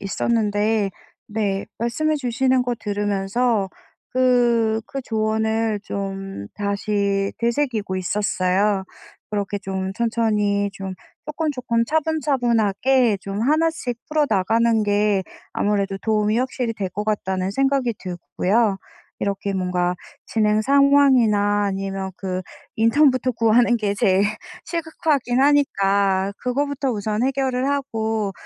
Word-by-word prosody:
있었는데 210 0 0 0.4
네 205 -2 -2
말씀해 305 +7 0
주시는 260 -1 +1
거 245 -1 -1
들으면서 205 +1 0 0.4
그 240 -3 +3
그 275 - -5
조언을 220 -1 0
좀 195 - -5
다시 200 -1 -1
되새기고 235 -5 -1
있었어요. 190 +1 0 0.5
그렇게 205 -1 -2
좀 190 -1 -4
천천히 210 -3 0
좀 195 -2 -6 0.3
쪼끔, 305 +1 -2
쪼끔 240 -3 0
차분차분하게 255 -6 +1
좀 195 +2 -5
하나씩 305 -2 +1
풀어나가는 230 -5 +2
게 205 -1 +2 0.3
아무래도 200 -1 0
도움이 215 0 +1
확실히 250 -2 -1
될 200 -4 -3
것 210 +4 -4
같다는 190 -3 -1
생각이 270 -1 +1
들고요. 195 +3 0 0.4
이렇게 200 0 -2
뭔가 180 -1 0 0.3
진행 215 -1 +1
상황이나 255 -7 +4
아니면 195 -1 -3
그 185 -1 -3 0.4
인턴부터 255 +2 +3
구하는 235 +1 +3
게 210 -3 -1
제일 195 -1 +3 0.4
시급하긴 310 -6 -1
하니까 200 -9 +2
그거부터 280 +2 -1
우선 215 0 -2
해결을 265 -1 0
하고 225 -7 -1
220 Hz, 260 characters per minute, -22 LUFS, 200-250 Hz, 0.5 s, 상황이나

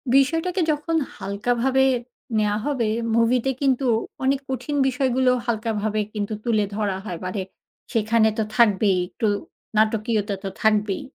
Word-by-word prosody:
বিষয়টাকে 325 +7 +2
যখন 305 +2 -2 0.2
হালকা 200 +5 -2
ভাবে 265 +1 +3 0.5
নেয়া 210 -1 +2
হবে, 260 -7 0 0.3
মুভিতে 235 +3 +3
কিন্তু 270 -1 +2 0.4
অনেক 270 +1 +2
কঠিন 260 +3 -3
বিষয়গুলোও 255 -1 +2
হালকা 230 -1 -1
ভাবে 215 0 0
কিন্তু 210 0 -3
তুলে 220 -4 +2
ধরা 205 -3 -1
হয়। 180 -5 -4
মানে 185 +2 -2 0.5
সেখানে 225 0 +3
তো 220 - +2
থাকবেই 205 -4 +4
একটু 220 - -2 0.5
নাটকীয়তা, 215 -1 +1
তো 195 - -2
থাকবেই। 210 -2 +2
230 Hz, 135 wpm, -23 LUFS, 210-260 Hz, 0.5 s, থাকবেই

